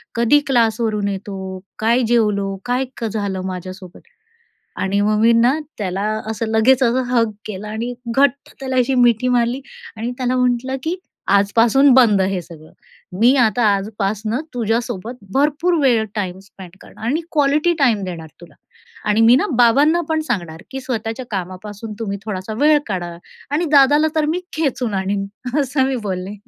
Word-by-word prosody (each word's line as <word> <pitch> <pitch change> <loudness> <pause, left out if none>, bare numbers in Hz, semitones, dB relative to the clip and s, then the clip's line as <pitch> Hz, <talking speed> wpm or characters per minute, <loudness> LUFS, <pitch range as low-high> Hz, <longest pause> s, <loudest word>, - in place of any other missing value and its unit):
कधी 235 +5 +4
क्लासवरून 225 -4 +1
येतो? 190 -1 -5 0.2
काय 235 +3 +2
जेवलो? 210 -4 +1
काय 250 +2 0 0.3
झालं 200 -3 -3
माझ्यासोबत? 185 0 -8 0.8
आणि 200 +1 0
मग 210 +1 +2
मी 230 +1 +5
ना 240 +6 +3 0.2
त्याला 190 -2 -3 0.3
असं 225 +1 -3
लगेच 225 +4 +3
असं, 250 +1 +2
हग 235 -3 +1 0.2
केला 210 0 -6
आणि 230 +3 -4 0.2
घट्ट 280 0 +1
त्याला 260 -1 -3
अशी 255 +1 +2
मिठी 245 -1 +3
मारली 245 +1 +1 0.4
आणि 230 +2 -3
त्याला 255 0 0
म्हटलं, 250 +1 0
की 330 +5 -2 0.4
आजपासून 230 +7 +4
बंद 230 -6 +5
हे 190 -1 -1
सगळं. 155 -2 -14 0.5
मी 245 +4 +6
आता 240 -1 +2
आजपासनं 215 +4 -2
तुझ्यासोबत 230 -1 -2 0.2
भरपूर 300 +5 +2
वेळ 240 -5 +3
टाइम 190 -3 -3
स्पेंड 190 -2 -13
करणार 220 - -12
आणि 295 +7 0
क्वालिटी 300 +3 +2
टाईम 235 -8 +2
देणार 170 -3 -7
तुला 175 - -15 0.5
आणि 210 +2 +3
मी 230 +2 +6
ना 410 - +1
बाबांना 280 +8 +4
पण 315 0 +1
सांगणार, 170 -6 -3
की 265 0 -5
स्वतःच्या 240 -1 -4
कामापासून 200 +3 -6
तुम्ही 200 -3 -4
थोडासा 210 0 -5
वेळ 300 +1 +5
काढा 175 -4 -4 0.3
आणि 305 +4 0
दादाला 290 +2 +5
तर 310 - +2
मी 345 +4 -1
खेचून 260 -8 -1
आणीन 195 +1 -1 0.3
असं 270 -1 +1
मी 265 - -1
बोलले. 185 +2 -4
230 Hz, 155 wpm, -19 LUFS, 200-260 Hz, 0.8 s, मी